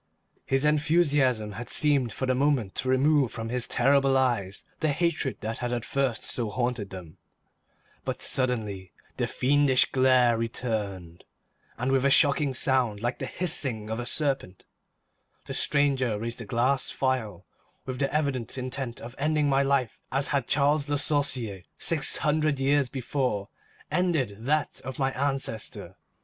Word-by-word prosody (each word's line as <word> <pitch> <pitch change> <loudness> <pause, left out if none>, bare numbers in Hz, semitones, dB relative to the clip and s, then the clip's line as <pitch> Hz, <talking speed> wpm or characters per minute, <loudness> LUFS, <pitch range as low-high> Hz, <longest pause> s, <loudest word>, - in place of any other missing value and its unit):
His 135 +2 +1
enthusiasm 145 -7 +2
had 115 +4 -7
seemed 140 -6 +2
for 130 - -3
the 130 - +1
moment 130 -6 +1
to 130 - -2
remove 135 0 +3
from 115 0 -5
his 125 0 -1
terrible 135 +1 +3
eyes 115 -7 0 0.2
the 155 - +1
hatred 170 -5 -1
that 110 +1 -4
had 120 -1 -3
at 120 -2 -2
first 135 -5 -1
so 115 -3 +1
haunted 120 -2 -2
them, 90 -2 -10 0.9
but - - -4
suddenly 110 -8 -1 0.3
the - - 0
fiendish 140 0 +2
glare 130 -3 +4
returned, 105 -7 -4 0.5
and 125 +3 -1
with 135 -1 +2
a 140 - +4
shocking 140 -1 +3
sound 125 -5 +2
like 120 +1 -2
the - - -4
hissing 135 -11 +1
of 110 - -3
a 120 - -3
serpent, 135 - -1 0.8
the - - -6
stranger 135 -6 +2
raised 115 +2 -5
a - - -7
glass 125 +6 +1
phial 125 -8 -2 0.4
with 130 -1 -5
the 140 - 0
evident 140 -6 -2
intent 130 -1 -4
of 120 - -8
ending 150 0 +1
my 135 -1 +3
life 135 -4 0
as 135 +1 0
had 140 -4 0
Charles 145 +1 +2
Le 145 - +1
Sorcier, 130 -9 +2 0.2
six 160 -4 0
hundred 150 -2 +1
years 140 -1 +2
before, 125 -6 -2 0.4
ended 160 - 0
that 150 +2 0
of 130 0 -6
my 135 -1 0
ancestor. 135 -5 -3
130 Hz, 155 wpm, -27 LUFS, 115-140 Hz, 0.9 s, glare